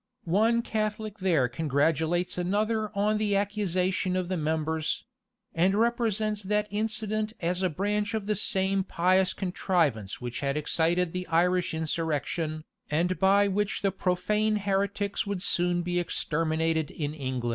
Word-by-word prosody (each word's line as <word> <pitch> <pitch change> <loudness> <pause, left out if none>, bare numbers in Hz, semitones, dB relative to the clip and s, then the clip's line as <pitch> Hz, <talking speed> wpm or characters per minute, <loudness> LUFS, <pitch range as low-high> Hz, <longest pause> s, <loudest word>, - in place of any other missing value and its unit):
One 220 +7 +2
Catholic 215 -1 -3
there 165 -9 +2
congratulates 160 +6 0
another 215 +4 0
on 210 +1 +2
the 210 -2 +1
accusation 190 -2 0
of 185 -1 -1
the 185 - 0
members; 160 0 -1 0.5
and 185 +4 +2
represents 220 -2 +1
that 210 +1 0
incident 215 0 -1
as 180 +2 -1
a 185 - +2
branch 205 +6 -1
of 215 -2 -2
the 210 0 0
same 190 0 +1
pious 185 +1 +2
contrivance 170 - -1
which 120 -1 -5
had 140 +1 -1
excited 165 +3 +1
the 180 0 -4
Irish 175 +1 +2
insurrection, 155 0 -2 0.3
and 170 +3 0
by 200 +2 +5
which 205 +1 -1
the 195 - +2
profane 205 +4 0
heretics 200 0 -1
would 200 -2 -2
soon 175 -2 +1
be 175 0 0
exterminated 160 -2 0
in 150 -2 -4
England. 130 -5 -3
185 Hz, 140 wpm, -28 LUFS, 165-205 Hz, 0.5 s, by